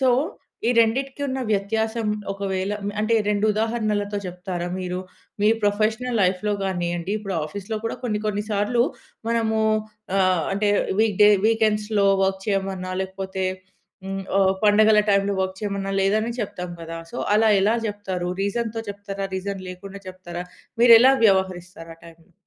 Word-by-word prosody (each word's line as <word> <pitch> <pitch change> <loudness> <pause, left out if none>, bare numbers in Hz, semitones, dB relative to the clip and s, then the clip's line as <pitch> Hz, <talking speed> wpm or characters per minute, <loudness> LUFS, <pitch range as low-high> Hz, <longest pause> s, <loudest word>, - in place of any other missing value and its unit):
So, 260 - +3 0.6
ఈ - - +4
రెండిటికి 265 +5 +1
ఉన్న 265 0 -2
వ్యత్యాసం, 220 +2 -1 0.2
ఒకవేళ 195 0 -2
మ్ - - -1
అంటే, 215 +2 +1
2 210 +1 +2
ఉదాహరణలతో 215 -2 -1
చెప్తారా? 180 -1 -4
మీరు, 180 0 -3 0.4
మీ 210 - +5 0.2
ప్రొఫెషనల్ 220 +4 +1
లైఫ్‌లో 185 +3 +1
గానియ్యండి, 175 0 -2
ఇప్పుడు 195 -3 -5
ఆఫీస్‌లో 200 +7 -5
గూడా 225 - -2
కొన్ని 210 -3 -1
కొన్ని 205 0 -1
సార్లు 210 +4 +2 0.5
మనమూ 220 -1 +1 0.6
ఆహ్, 185 -4 +2
అంటే, 205 0 +1 0.3
వీక్‌ 215 -3 +1
డే, 210 - +8 0.2
వీకెండ్స్‌లో 215 -2 +2 0.2
వర్క్ 190 0 0
చెయమన్నా, 190 -2 -2
లేకపోతే 190 0 -4 0.6
హ్మ్, 195 0 -4
ఓ - - +4 0.2
పండగల 215 +1 +5
టైమ్‌లో 200 0 +2
వర్క్ 190 0 -2
చెయమన్నా, 200 -1 -3
లేదనే 215 +4 +1
చెప్తాం 180 -3 -5
గదా! 165 0 -6
సో, - - -8 0.2
అలా 220 +1 +4
ఎలా 210 +4 +3
జెప్తారు? 190 -4 -3
రీజన్‍తో 225 +2 -2
చెప్తారా? 200 -1 -5
రీజన్ 195 0 -4
లేకుండా 195 +2 -9
చెప్తారా? 180 -1 -7 0.4
మీరెలా 240 +2 +8
వ్యవహరిస్తారు 180 -3 -1
ఆ - - -30
టైమ్‌లో? 165 0 -16
200 Hz, 140 wpm, -23 LUFS, 190-220 Hz, 0.6 s, డే